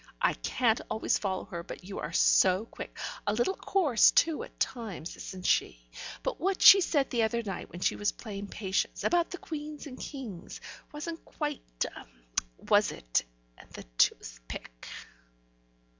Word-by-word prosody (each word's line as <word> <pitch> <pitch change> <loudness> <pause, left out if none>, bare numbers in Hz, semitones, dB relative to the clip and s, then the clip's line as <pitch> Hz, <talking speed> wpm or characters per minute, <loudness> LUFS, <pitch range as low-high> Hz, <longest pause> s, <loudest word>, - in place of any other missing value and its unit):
"I - - +3
can't 230 -3 +1
always 220 0 +1
follow 190 -2 -2
her, 170 - -6
but 170 - -9
you 195 +2 -6
are 150 - -4
so 185 +3 +4
quick! - - -9 0.3
A 205 - +3
little 240 - +1
coarse 330 - +4
too, 325 -2 +3
at - - -10
times, 215 -9 -3
isn't 185 -1 -8
she? - - +2 0.4
What 380 +2 -1
she 390 - +10
said 290 -6 +1
the 235 - +2
other 230 +1 +1
night 195 -3 -5
when 175 - -9
she - - +2
was 205 - 0
playing 205 -3 -7
Patience, 195 -2 -2
about 345 -1 +2
the 360 - -6
queens 300 -2 -7
and 260 -3 -9
kings, 230 - -7 0.3
wasn't 325 +2 -6
quite 295 -2 -4 1.1
was - - +4
it? - - 0 0.4
And - - -15
the - - -8 0.2
toothpick." - - -1
225 Hz, 155 wpm, -30 LUFS, 190-295 Hz, 1.1 s, she